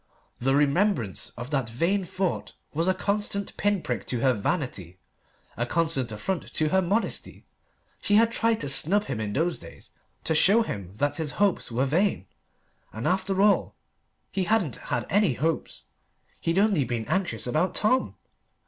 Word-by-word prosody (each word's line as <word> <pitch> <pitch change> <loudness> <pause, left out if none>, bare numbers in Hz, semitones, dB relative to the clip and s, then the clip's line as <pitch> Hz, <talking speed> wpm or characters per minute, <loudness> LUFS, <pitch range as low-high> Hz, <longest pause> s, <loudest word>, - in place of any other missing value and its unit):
The 135 +2 +2
remembrance 145 - +1
of 120 +4 -7
that 135 -5 0
vain 175 - 0
thought 185 0 -2 0.2
was 165 +4 0
a 185 - +4
constant 200 -1 -2
pin 205 -3 0
prick 120 -3 -3
to 120 -3 -2
her 130 0 +4
vanity, 100 - -3 0.6
a 120 +1 -2
constant 160 -6 0
affront 165 - -3
to 155 -1 +1
her 190 +4 +3
modesty. 200 +6 -2 0.6
She 205 - +2
had 225 +2 +5
tried 230 -1 +1
to 145 - -2
snub 190 +9 +3
him 130 - -4
in 105 -1 -3
those 165 +6 0
days - - -13 0.3
to - - 0
show 200 +8 +5
him 100 - -6
that 145 +6 0
his 160 -3 -3
hopes 200 -10 +1
were 125 +4 +1
vain. 170 - +1 0.7
And 110 +2 -4
after 190 +1 +1
all 205 -1 +3 0.6
he 190 -2 -1
hadn't 185 - +1
had - - -3
any 205 -7 +3
hopes: 160 +6 -2 0.6
he'd 165 +2 -1
only 200 -7 +3
been 120 -2 -3
anxious 180 - -1
about 155 +9 0
Tom! 255 +5 +2
165 Hz, 165 wpm, -26 LUFS, 125-200 Hz, 0.7 s, had